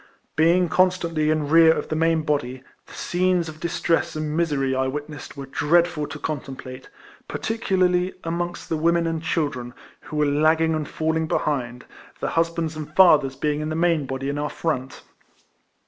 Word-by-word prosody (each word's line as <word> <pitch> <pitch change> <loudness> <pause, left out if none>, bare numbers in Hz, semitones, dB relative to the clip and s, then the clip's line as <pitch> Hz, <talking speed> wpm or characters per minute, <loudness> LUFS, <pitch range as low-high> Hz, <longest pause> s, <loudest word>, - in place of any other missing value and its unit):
Being 170 +3 +4
constantly 170 -3 +1
in 155 -2 +1
rear 165 +1 +7
of - - -2
the 155 - -1
main 165 0 +2
body, 130 -4 -2 0.2
the - - -14
scenes 180 -1 0
of 155 0 -9
distress 170 -1 0
and 155 0 -3
misery 145 -5 0
I 130 0 +1
witnessed 150 +2 -6
were 140 - -6
dreadful 150 +3 +1
to 145 +2 -7
contemplate, 135 -3 -6 0.4
particularly 185 -5 0
amongst 175 +1 -3
the 160 - 0
women 170 +2 +2
and 165 -1 -2
children, 145 -7 -2 0.2
who 155 - -10
were 150 - +3
lagging 155 +3 +3
and 155 -2 -3
falling 160 0 -1
behind, 125 -6 -2 0.3
their - - -2
husbands 165 -1 0
and 155 0 -8
fathers 150 -8 +5
being 150 +1 -1
in 155 - -3
the 155 - -2
main 165 -4 +1
body 135 +1 -4
in 145 +1 -2
our 150 0 -2
front. 135 -5 -3
155 Hz, 165 wpm, -23 LUFS, 145-165 Hz, 0.4 s, rear